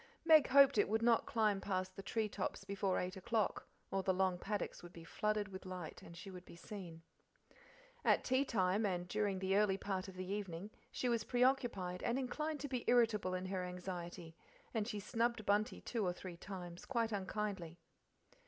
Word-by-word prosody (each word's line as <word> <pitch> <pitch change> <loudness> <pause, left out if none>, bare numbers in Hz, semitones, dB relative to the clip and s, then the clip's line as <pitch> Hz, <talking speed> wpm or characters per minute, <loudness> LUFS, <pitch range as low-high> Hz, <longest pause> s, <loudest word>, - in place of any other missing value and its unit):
Meg 315 -4 +8
hoped 275 -4 +7
it 205 - +3
would 220 +1 +1
not 235 -1 +4
climb 210 -3 +2
past 185 -1 -2
the - - -6
tree 220 +2 -1
tops - - -3
before 195 -1 0
eight 180 0 -2
o'clock, 210 +2 0 0.2
or 195 - +1
the 190 - +2
long 185 -1 +1
paddocks 205 0 -3
would 175 - -10
be 170 -2 -11
flooded 210 +3 -1
with 190 -1 -8
light 185 -4 -6
and 170 - -11
she 195 - -8
would 180 -1 -9
be - - -13
seen. 170 -3 -8 1.0
At - - +4
tea 260 +2 +3
time, 195 -4 +1
and 180 -3 0
during 205 0 0
the 190 +1 +1
early 205 -2 +4
part 190 -1 -2
of 190 - -9
the 185 0 -4
evening, 195 0 -4 0.2
she 250 - -1
was 235 -2 +2
preoccupied 245 -8 +1
and 235 - 0
inclined 300 +4 -2
to 285 - -2
be 255 -3 -2
irritable 220 -6 +3
in 185 0 -3
her 185 -1 -2
anxiety, 180 -2 -6 0.4
and 220 -3 0
she 210 -4 -3
snubbed 230 +1 0
Bunty 210 +4 +2
two 230 -3 -2
or 180 -2 +1
three 180 0 -8
times 175 -1 -8
quite 235 -4 0
unkindly. 195 -4 -3
195 Hz, 190 wpm, -37 LUFS, 185-225 Hz, 1.0 s, Meg